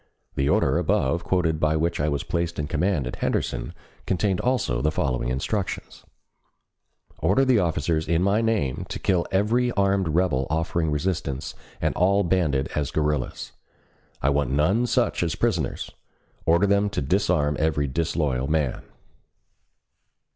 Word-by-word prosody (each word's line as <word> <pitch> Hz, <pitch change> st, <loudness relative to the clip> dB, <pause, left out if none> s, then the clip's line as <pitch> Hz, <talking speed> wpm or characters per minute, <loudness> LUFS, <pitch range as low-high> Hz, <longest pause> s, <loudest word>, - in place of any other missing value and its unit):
The 70 Hz, +2 st, 0 dB
order -, -, +2 dB
above 80 Hz, +6 st, +1 dB
quoted 85 Hz, -4 st, 0 dB
by 75 Hz, 0 st, +2 dB
which 85 Hz, +2 st, 0 dB
I 75 Hz, +1 st, +1 dB
was 70 Hz, -2 st, -1 dB
placed 85 Hz, 0 st, -2 dB
in 75 Hz, -, -1 dB
command 80 Hz, 0 st, 0 dB
at 60 Hz, -, -5 dB
Henderson -, -, -2 dB, 0.4 s
contained 95 Hz, 0 st, +1 dB
also 120 Hz, -, 0 dB
the 75 Hz, -, +2 dB
following 65 Hz, -5 st, -1 dB
instructions: 90 Hz, -, -3 dB, 1.2 s
Order 100 Hz, +11 st, +3 dB
the 130 Hz, -4 st, +4 dB
officers 80 Hz, -2 st, 0 dB
in 85 Hz, +2 st, +2 dB
my 100 Hz, +3 st, +2 dB
name 110 Hz, -, -1 dB
to -, -, -4 dB
kill 90 Hz, -3 st, 0 dB
every 115 Hz, +6 st, +2 dB
armed 100 Hz, -2 st, +1 dB
rebel 80 Hz, -5 st, +1 dB
offering 80 Hz, +1 st, 0 dB
resistance 75 Hz, -3 st, -2 dB, 0.3 s
and -, -, 0 dB
all 100 Hz, +3 st, +3 dB
banded 80 Hz, -7 st, +1 dB
as 75 Hz, -3 st, -1 dB
guerrillas. 75 Hz, -1 st, -2 dB, 0.7 s
I 70 Hz, -, +3 dB
want 70 Hz, -2 st, +1 dB
none 95 Hz, -, +2 dB
such 125 Hz, 0 st, +1 dB
as 85 Hz, -4 st, 0 dB
prisoners. -, -, -1 dB, 0.6 s
Order 85 Hz, +4 st, +4 dB
them 100 Hz, +1 st, +2 dB
to 100 Hz, -, -3 dB
disarm 75 Hz, -2 st, +1 dB
every 75 Hz, -2 st, +1 dB
disloyal 70 Hz, -2 st, -1 dB
man. 75 Hz, -4 st, 0 dB
80 Hz, 145 wpm, -24 LUFS, 75-95 Hz, 1.2 s, the